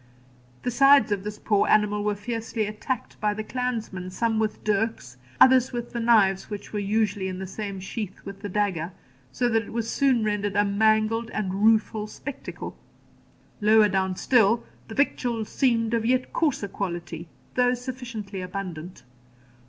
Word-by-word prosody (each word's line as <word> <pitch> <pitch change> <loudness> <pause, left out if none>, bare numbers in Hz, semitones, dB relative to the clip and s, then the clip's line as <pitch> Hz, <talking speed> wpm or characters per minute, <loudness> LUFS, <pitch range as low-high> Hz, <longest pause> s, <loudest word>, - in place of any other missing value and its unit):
The 250 - -1
sides 275 -2 +6
of 200 -2 0
this 210 0 -5
poor 205 -2 +1
animal 210 -1 +3
were 210 0 0
fiercely 225 +1 -3
attacked 215 +4 -5
by 210 -1 +1
the 215 - -4
clansmen, 225 -7 -3
some 225 +3 0
with 215 -1 -2
dirks, 205 - -1 0.2
others 260 -1 +6
with 240 -1 -5
the 235 - -2
knives 215 -5 +3
which 205 0 -7
were 210 - -1
usually 205 -1 0
in 185 -1 -4
the 190 - -5
same 200 0 -5
sheath 195 0 -5
with 195 0 -8
the 205 - -5
dagger, 185 -4 -1 0.4
so 245 - 0
that 225 -1 +2
it 220 - -10
was 230 -1 -2
soon 260 -3 +2
rendered 205 -1 -1
a 205 0 +4
mangled 220 +2 +2
and 190 -3 -1
rueful 220 -1 +3
spectacle. 275 +5 -7 0.9
Lower 215 0 +5
down 190 -1 0
still, 230 +1 +3 0.2
the 220 - -8
victuals 240 -5 0
seemed 235 -4 +1
of 230 -1 +1
yet 255 +2 +1
coarser 290 -10 0
quality, 175 -4 -5 0.3
though 250 0 +3
sufficiently 240 -6 -6
abundant. 180 -2 -6
215 Hz, 160 wpm, -25 LUFS, 200-235 Hz, 0.9 s, sides